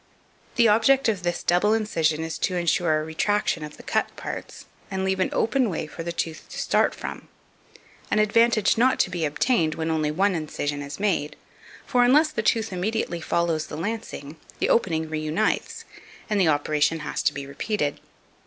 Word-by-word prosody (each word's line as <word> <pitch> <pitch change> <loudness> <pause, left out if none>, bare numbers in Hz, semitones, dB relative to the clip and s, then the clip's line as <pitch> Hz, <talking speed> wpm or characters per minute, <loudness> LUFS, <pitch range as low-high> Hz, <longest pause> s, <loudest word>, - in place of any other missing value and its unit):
The 235 -1 +5
object 230 +6 +4
of 205 -5 -1
this 175 -1 -2
double 205 +5 +3
incision 160 -8 0
is 160 0 -5
to 185 - 0
insure 170 -2 +2
a - - -3
retraction 165 +1 0
of 150 0 -8
the - - -12
cut - - 0
parts, - - -7 0.2
and 190 -1 -2
leave 190 0 0
an 185 - +2
open 240 +1 +1
way 165 -3 -3
for 155 +2 -8
the 170 +1 -3
tooth 165 -1 -4
to - - -9
start - - +2
from - - -7 0.8
an - - +1
advantage 220 0 +3
not 255 +2 +3
to 180 - -1
be 175 -3 -1
obtained 155 - +1
when 160 0 -2
only 155 -1 0
one 190 +6 +2
incision 145 -3 -3
is 140 +4 -7
made; 190 -7 0 0.5
for 245 -1 +3
unless 300 +5 +5
the 220 - -2
tooth 220 -1 +1
immediately 180 -2 -2
follows 165 -1 0
the 150 - -7
lancing, 165 -6 -5 0.2
the - - 0
opening 160 -8 +2
reunites, 155 +6 -1 0.5
and 205 -2 +3
the 180 - +4
operation 155 +1 +1
has - - -3
to 160 - +2
be 140 -1 -6
repeated. 145 +2 -2
175 Hz, 180 wpm, -25 LUFS, 155-215 Hz, 0.8 s, The